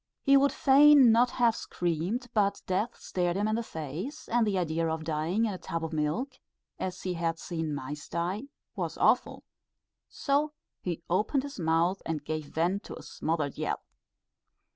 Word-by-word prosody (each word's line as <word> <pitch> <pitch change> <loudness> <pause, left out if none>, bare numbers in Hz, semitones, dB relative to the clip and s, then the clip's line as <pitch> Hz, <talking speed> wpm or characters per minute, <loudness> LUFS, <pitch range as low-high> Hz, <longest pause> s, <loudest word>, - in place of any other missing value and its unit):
He 275 - +5
would 275 +1 +5
fain 280 -2 +7
not 240 +2 +4
have 235 -3 +2
screamed, 175 +9 -2
but 200 -2 +1
death 205 +6 -1
stared 175 -1 -1
him 205 +1 +1
in 215 - 0
the 230 - 0
face, 180 - -6
and 235 -1 +2
the 200 -2 +1
idea 165 -2 0
of 160 0 -3
dying 160 +8 0
in 210 - -1
a 185 - -7
tub 165 -1 -3
of 160 - -6
milk, 185 - -2 0.4
as 185 -1 -4
he 185 - -1
had 165 -1 -1
seen 160 -4 -3
mice 145 +2 -6
die, 180 +8 -2 0.3
was - - -3
awful; - - +2 0.7
so 295 +1 0 0.3
he 170 -2 -4
opened 210 +10 +1
his 280 -6 -7
mouth 165 +3 +1
and 155 -3 -3
gave 155 0 -3
vent 180 +7 0
to - - -7
a - - -11
smothered 155 -3 -2
yell. - - -2
180 Hz, 175 wpm, -29 LUFS, 160-235 Hz, 0.7 s, fain